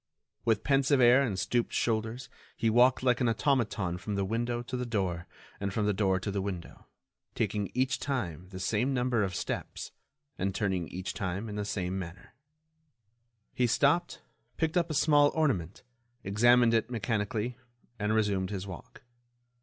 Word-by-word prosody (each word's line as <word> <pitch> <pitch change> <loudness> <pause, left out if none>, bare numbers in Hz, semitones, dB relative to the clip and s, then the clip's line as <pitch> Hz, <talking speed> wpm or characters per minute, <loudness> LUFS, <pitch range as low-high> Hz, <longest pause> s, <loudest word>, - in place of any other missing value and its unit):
With 110 -3 +2
pensive 140 0 +3
air 125 +2 +7
and 110 -9 -1
stooped 120 +4 0
shoulders, 115 +2 -1 0.3
he 115 - +2
walked 125 +3 +4
like 125 -1 +2
an 120 - +3
automaton 110 -8 0
from 105 +2 -4
the 100 -1 0
window 120 +3 -1
to 125 - -5
the 125 - -2
door 95 -6 -2 0.3
and 100 0 -2
from 105 +2 0
the 105 - +2
door 95 -2 +1
to 100 - -3
the 100 0 -1
window, 95 -4 -6 0.5
taking 105 -2 -1
each 130 +1 +1
time 95 - -3
the 95 -1 -8
same 115 +8 0
number 125 -2 +1
of 95 -3 -1
steps, - - -4 0.5
and 95 +1 -1
turning 95 -5 -1
each 95 +1 -5
time 95 +3 -3
in 105 - -6
the 105 -1 -2
same 95 -2 -2
manner. 90 +1 -9 1.2
He 125 - +2
stopped, 145 +9 +1 0.3
picked 160 -1 0
up 170 -1 +2
a 155 - -2
small 145 0 +5
ornament, 110 - 0 0.4
examined 120 +4 +4
it 115 0 +1
mechanically, 115 +1 -2 0.4
and 105 0 0
resumed 100 -4 +1
his 100 -2 -4
walk. 95 +4 -10
110 Hz, 165 wpm, -30 LUFS, 95-125 Hz, 1.2 s, air